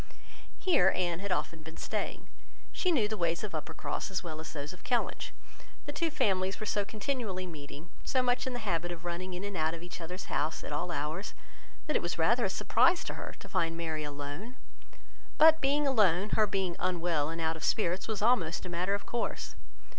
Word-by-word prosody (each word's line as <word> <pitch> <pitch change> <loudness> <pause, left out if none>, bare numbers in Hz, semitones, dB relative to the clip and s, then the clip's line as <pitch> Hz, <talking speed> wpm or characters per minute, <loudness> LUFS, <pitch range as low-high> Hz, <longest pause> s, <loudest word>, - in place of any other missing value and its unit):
Here 260 - +4
Anne 175 -2 0
had 200 0 -3
often 165 -2 -1
been 160 +1 -10
staying. - - -3 0.4
She 365 - +1
knew 240 -10 +3
the 215 0 -3
ways 170 +1 +1
of 210 - -4
Uppercross 160 +4 -3
as 190 - -1
well 160 -3 -5
as 160 - -6
those 145 0 -5
of 180 - -15
Kellynch. 245 -2 0 0.5
The 290 - -3
two 330 +2 +1
families 190 -8 +1
were 215 - -3
so 205 -1 +1
continually 210 -2 -2
meeting, 150 -1 -9
so 260 -2 +2
much 245 +1 +1
in 260 - -1
the 245 -3 -4
habit 175 -2 0
of 175 0 -7
running 180 +1 -3
in 180 - -5
and 200 -1 -3
out 160 0 +1
of 165 - -9
each 175 0 -7
other's 180 +3 -5
house 155 +2 -1
at - - -4
all 150 +4 -1
hours, 155 +5 -3 0.5
that - - -1
it - - +4
was - - -2
rather - - +4
a - - +1
surprise 350 +1 +4
to - - -4
her - - -6
to - - -11
find 165 -3 0
Mary 160 -2 -2
alone; 145 - -5 0.8
but 320 0 +8
being 285 +2 +3
alone, 210 -7 +4
her 215 -1 +4
being 190 -3 0
unwell 170 -4 +1
and 165 +1 -4
out 160 0 +1
of 160 - -8
spirits 185 -3 +1
was 215 -2 -2
almost 185 -10 +3
a - - -4
matter 180 +3 +1
of 200 - -6
course. 235 -1 -2
180 Hz, 210 wpm, -32 LUFS, 165-215 Hz, 0.8 s, but